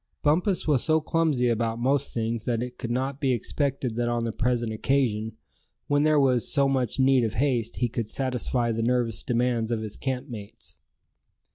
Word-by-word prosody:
Bumpus 175 +6 +1
was 145 -5 +3
so 160 -1 +3
clumsy 155 -5 +1
about 115 -1 0
most 135 +3 0
things 115 -1 -2
that 120 -1 0
it 125 0 -8
could 115 - -4
not 130 +4 -2
be 135 -3 +2
expected 130 0 -2
that 120 0 0
on 120 -1 0
the 115 - -1
present 120 0 -1
occasion, 110 -3 0 0.5
when 145 0 +2
there 155 0 +4
was 130 -4 +2
so 140 -1 +3
much 130 -2 -1
need 130 -1 +4
of 110 -1 -2
haste 120 -3 0
he 125 - 0
could 115 -2 -4
satisfy 125 -2 -1
the 115 0 -1
nervous 120 -2 0
demands 120 -2 0
of 115 -2 -1
his 105 -2 -6
camp 130 0 -3
mates. 105 - -10
125 Hz, 185 wpm, -26 LUFS, 115-135 Hz, 0.5 s, there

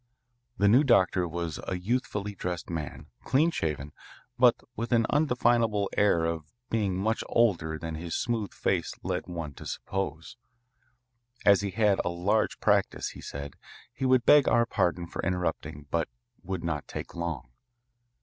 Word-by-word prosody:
The 100 - +3
new 125 +8 +6
doctor 95 -8 +3
was 85 -2 -4
a 90 - -1
youthfully 105 0 -2
dressed 90 -3 -4
man, 75 -4 -5 0.2
clean 155 +6 +3
shaven, 75 - -3 0.4
but 125 -2 +6 0.2
with 115 +3 -4
an 115 -2 +4
undefinable 120 -8 +2
air 85 -5 +3
of 80 -2 -3 0.2
being 100 -5 0
much 110 +4 0
older 85 -9 +2
than 80 0 -5
his 85 +1 -4
smooth 115 -5 -1
face - - -1
led 90 0 -2
one 85 -5 -5
to - - -10
suppose. 95 +1 -4 1.1
As 100 -1 +6
he 100 - -2
had 105 0 +2
a - - -1
large 95 +5 0
practice, - - +1
he - - -11
said, 70 +1 -7 0.4
he 130 - -3
would 130 -1 +4
beg 145 -2 +7
our 115 0 +4
pardon 85 -6 0
for - - -5
interrupting 90 -5 -2
but - - 0 0.3
would 95 -2 -4
not 80 -4 -3
take - - -7
long. 80 -8 -4
95 Hz, 155 wpm, -28 LUFS, 85-115 Hz, 1.1 s, beg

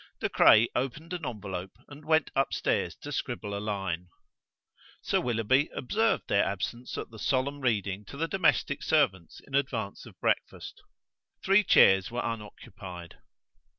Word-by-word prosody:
De - - -1
Craye 110 +2 +6
opened 145 +7 -3
an 175 -3 -5
envelope 95 -4 -6
and 145 +1 -12
went 155 -1 +2
upstairs 135 0 0
to - - -9
scribble 100 -1 -4
a - - -3
line. 95 -4 -3 1.0
Sir - - +1
Willoughby 125 +4 +1
observed 220 - 0
their 100 - +3
absence 110 +5 -4
at - - -6
the 110 - -11
solemn 140 +4 0
reading 105 -5 -1
to 140 - -10
the 165 +2 -1
domestic 170 -6 +1
servants 100 - 0
in 135 - -18
advance 120 -7 -2
of - - -16
breakfast. - - -2 0.6
Three 195 +2 +5
chairs 95 - +5
were 120 +1 -3
unoccupied. 100 -6 -8
120 Hz, 145 wpm, -28 LUFS, 100-140 Hz, 1.0 s, Craye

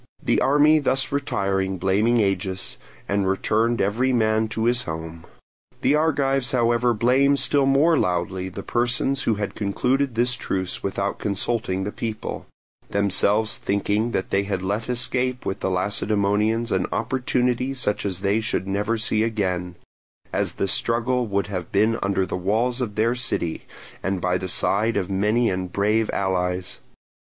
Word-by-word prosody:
The - - +2
army 150 +3 +5
thus 130 -2 0
retired 95 -9 -1
blaming 105 +6 +2
Agis, 95 -1 -2 0.3
and 100 -1 +1
returned 110 +4 +1
every 115 +7 +1
man 110 -2 +2
to 110 +1 -2
his 120 +1 +3
home. 80 -1 -7 0.6
The 135 - +3
Argives 135 -4 +1
however 120 0 +2
blamed 135 +5 +3
still 140 -2 +3
more 150 +4 +4
loudly 90 +1 -1
the 95 +2 -7
persons 120 +3 0
who 115 - +1
had 105 0 -3
concluded 125 +6 0
the 120 +2 +3
truce 95 -7 -2
without 100 0 -2
consulting 100 -1 -1
the 105 - -3
people, 110 -1 -5 0.4
themselves 100 +2 +2
thinking 105 +3 0
that 95 -5 -3
they 100 - +3
had 100 -2 -3
let 105 +5 -2
escape 125 +1 -1
with 95 - -3
the - - -1
Lacedaemonians 105 +3 0
an 95 -1 +1
opportunity 125 +2 0
such 115 -5 -1
as 95 -2 -3
they 100 +3 +1
should 110 -3 -2
never 105 +4 0
see 110 0 +1
again; 90 -6 -1 0.6
as - - 0
the 100 - -1
struggle 120 +4 0
would 100 -1 0
have 90 -4 -5
been 110 +3 +2
under 100 -1 +1
the - - -4
walls 115 +7 0
of 105 -5 -3
their 115 +2 +2
city, 115 -9 -3 0.3
and 95 0 -1
by 90 0 0
the 95 0 -4
side 110 +6 +1
of 95 +1 -2
many 105 +5 +2
and 90 -1 -3
brave 105 +3 +1
allies. 90 -1 -1
110 Hz, 155 wpm, -23 LUFS, 95-120 Hz, 0.6 s, army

